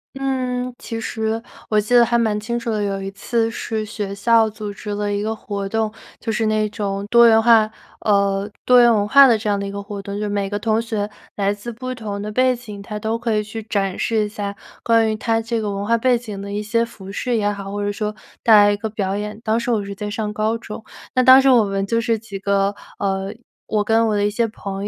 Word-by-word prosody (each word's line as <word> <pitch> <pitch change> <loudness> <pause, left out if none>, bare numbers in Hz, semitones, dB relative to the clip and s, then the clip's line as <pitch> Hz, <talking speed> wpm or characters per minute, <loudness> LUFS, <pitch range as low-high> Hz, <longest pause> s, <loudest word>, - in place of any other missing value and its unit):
嗯， 255 -2 -2
其 225 0 -5
实 220 0 -2 0.3
我 215 -1 +3
记 215 +4 -2
得 240 - +8
还 235 0 +2
蛮 220 -3 +1
清 235 +3 -3
楚 235 0 -3
的， 215 -1 -1
有 195 -1 -1
一 195 0 -5
次 225 +3 -1
是 220 -2 -3
学 205 -2 -5
校 225 +2 +3
组 210 -1 -6
织 210 - -9
了 205 0 -1
一 200 - -1
个 220 +1 -2
活 200 -2 -5
动， 220 0 -1 0.3
就 225 - -3
是 220 0 0
那 215 0 +1
种 200 -2 -3
多 235 0 +8
元 225 -1 +6
化 225 -2 +5 0.3
呃， 200 -1 +1 0.2
多 250 0 +7
元 240 - +6
文 205 -2 +2
化 275 +5 +8
的 230 -3 +4
这 215 - -5
样 205 -1 +1
的 200 - -3
一 - - -5
个 200 0 -5
活 200 -1 -6
动， 200 0 -6
就 205 - -4
是 210 - -1
每 200 -1 -1
个 205 - -2
同 220 +2 +1
学 215 -3 -2 0.3
来 200 0 +1
自 205 +4 -7
不 255 +3 -5
同 210 -4 -5
的 210 - -4
背 255 +2 +3
景， 210 -4 -9
他 210 +1 -6
都 220 +2 -2
可 230 -2 0
以 210 - +1
去 220 +1 -7
展 200 -3 -2
示 220 -2 +1
一 - - -3
下 205 -1 -5 0.3
关 225 -1 +3
于 - - -1
他 225 +1 0
这 225 0 -2
个 210 - -2
文 200 +1 -3
化 230 - +3
背 245 +1 +3
景 215 -5 -7
的 200 0 -6
一 205 +1 -3
些 230 +2 +1
服 195 -4 -9
饰 240 +2 -1
也 205 -1 +1
好， 200 -1 -7
或 205 0 -3
者 205 - 0
说 210 +1 -3 0.3
带 225 -3 +6
来 205 0 +7
一 205 - -1
个 220 +2 -4
表 200 -2 -2
演。 210 +1 -5
当 220 +1 +1
时 235 - -3
我 215 -4 +1
是 200 - -6
在 205 +1 -5
上 210 0 -3
高 215 +2 0
中， 220 -1 -9 0.3
那 255 - +3
当 260 +1 +9
时 270 0 +4
我 240 -3 +6
们 195 0 -1
就 230 +3 0
是 230 -1 +1
几 210 -3 -8
个 200 0 +1 0.2
呃， 195 0 -2 0.4
我 210 -1 +1
跟 225 +2 +3
我 215 - +1
的 205 0 +1
一 205 - +1
些 230 +2 +1
朋 200 -2 -5
215 Hz, 280 characters per minute, -20 LUFS, 205-230 Hz, 0.4 s, 当